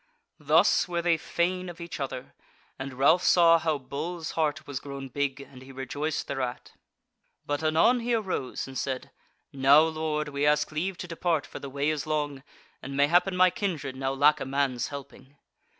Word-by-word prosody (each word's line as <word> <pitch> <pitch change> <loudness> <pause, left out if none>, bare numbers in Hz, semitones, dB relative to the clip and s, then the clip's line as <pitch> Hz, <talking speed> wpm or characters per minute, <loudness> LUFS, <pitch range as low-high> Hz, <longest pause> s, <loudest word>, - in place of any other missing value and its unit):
Thus - - +4
were 170 -1 -2
they 170 -1 +3
fain 180 +3 -1
of 175 - -10
each 170 -2 -7
other, 130 -2 -5 0.5
and 135 0 -5
Ralph 145 +7 +4
saw 165 -2 +6
how 160 -2 0
Bull's 155 +5 -5
heart 155 -1 -1
was 140 -4 -4
grown 140 -1 -7
big, 140 0 -2
and 130 -2 -13
he 130 +1 -12
rejoiced 145 +4 -3
thereat. 130 -3 -4 0.7
But 145 +1 -2
anon 160 +11 +3
he 240 0 0
arose 190 - -3
and 135 - -10
said: 130 0 -3 0.4
"Now, 140 +2 +6
Lord, 155 -1 -1
we 140 0 -3
ask 150 +1 +2
leave 175 +4 -2
to 180 - -6
depart 165 -2 -1
for - - -9
the 140 - -7
way 140 +3 0
is 155 -1 -3
long, 145 -3 -2 0.4
and 135 +1 -6
mayhappen 175 +6 +3
my 185 0 +6
kindred 165 - -3
now 135 0 -2
lack 145 +2 +4
a - - -4
man's 135 -3 0
helping." 140 0 -10
150 Hz, 180 wpm, -27 LUFS, 135-165 Hz, 0.7 s, saw